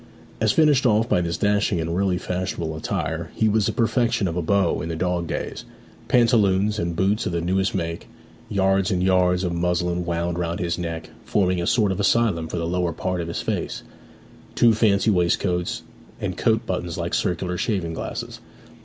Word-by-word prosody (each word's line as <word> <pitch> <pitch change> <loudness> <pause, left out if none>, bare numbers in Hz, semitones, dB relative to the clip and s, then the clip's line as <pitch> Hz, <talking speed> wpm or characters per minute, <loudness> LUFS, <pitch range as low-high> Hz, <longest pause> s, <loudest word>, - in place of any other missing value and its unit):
As - - +3
finished 145 -5 +4
off 110 0 +3
by 90 - +2
this 85 -1 -2
dashing 100 -2 +1
and 85 +1 -2
really 95 -1 +1
fashionable 90 -3 -3
attire, 80 +1 -3
he 110 - +2
was 105 -1 +2
the - - +1
perfection 115 -4 +1
of 85 - -3
a 90 - 0
beau 95 +1 +1
in 80 - -4
the 85 - -3
dog 85 0 -1
days; - - -4 0.4
pantaloons 105 -4 +3
and 85 0 -2
boots 100 +5 +1
of 90 - -3
the 85 - 0
newest 95 +3 0
make; 85 -2 -3 0.4
yards 95 -1 +2
and 90 -1 0
yards 90 -1 +3
of 90 -2 -1
muslin 90 0 0
wound 85 0 -2
round 85 0 -2
his 85 0 -2
neck, 80 -1 -5
forming 90 -3 +1
a 85 - -2
sort 105 -5 +3
of 95 - -3
asylum 100 -5 +2
for 85 - -4
the 85 - -2
lower 90 0 -1
part 90 -1 -2
of 85 - -5
his 70 -8 -4
face; - - -3 0.7
two 115 -1 +5
fancy 110 -1 +3
waistcoats, 90 -1 0 0.4
and - - -3
coat - - +1
buttons - - -3
like - - -3
circular 90 0 -1
shaving 90 -3 -1
glasses. - - -5
90 Hz, 190 wpm, -23 LUFS, 85-100 Hz, 0.7 s, two